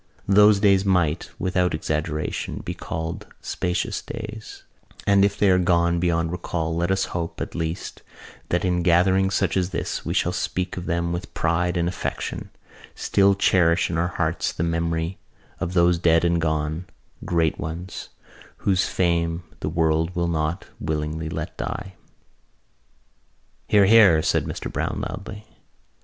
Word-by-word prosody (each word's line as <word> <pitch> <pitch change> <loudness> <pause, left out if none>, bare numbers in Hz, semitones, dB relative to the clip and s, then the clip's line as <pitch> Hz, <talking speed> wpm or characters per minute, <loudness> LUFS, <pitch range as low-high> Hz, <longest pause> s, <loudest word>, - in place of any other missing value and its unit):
Those 105 +1 +6
days 100 -2 +4
might, 90 -5 +1
without 90 -2 0
exaggeration, 75 0 -3
be - - -3
called 80 +1 -5
spacious 90 0 -2
days: 110 -1 -8 0.4
and 100 -1 +5
if 100 0 +2
they 100 - +3
are 90 - +4
gone 85 -1 +2
beyond 85 -1 +1
recall 85 -2 -3
let 85 +2 0
us 95 0 +1
hope, 85 -1 -4
at - - -4
least, 80 +2 -4 0.5
that 90 +2 +1
in 90 -1 +1
gatherings 95 +2 +3
such 95 -4 +1
as 90 -1 +1
this 95 - -3
we - - -3
shall - - +2
still - - -1
speak 90 0 -3
of 90 - -6
them 85 0 0
with 90 +5 -5
pride 85 +2 +1
and 85 0 +1
affection, 90 - -4 0.5
still 100 0 +3
cherish 85 -3 +3
in 80 - -1
our 85 - +1
hearts - - -1
the - - -3
memory 85 +1 -1 0.4
of 90 - -3
those 85 -1 +4
dead 85 0 +4
and 85 -1 +2
gone 80 +2 -1 0.4
great 80 -3 +1
ones 85 +4 -6 0.6
whose 95 -1 +3
fame 85 -1 0 0.2
the - - -2
world 80 +2 +1
will 85 -1 0
not 80 0 -1
willingly 80 +1 -3
let - - -5
die." 95 -1 -5 1.7
"Hear, 100 -1 +5
hear!" 95 -7 +6
said - - +1
Mr - - -5
Browne - - -2
loudly. 100 +3 -8
85 Hz, 150 wpm, -24 LUFS, 80-95 Hz, 1.7 s, Those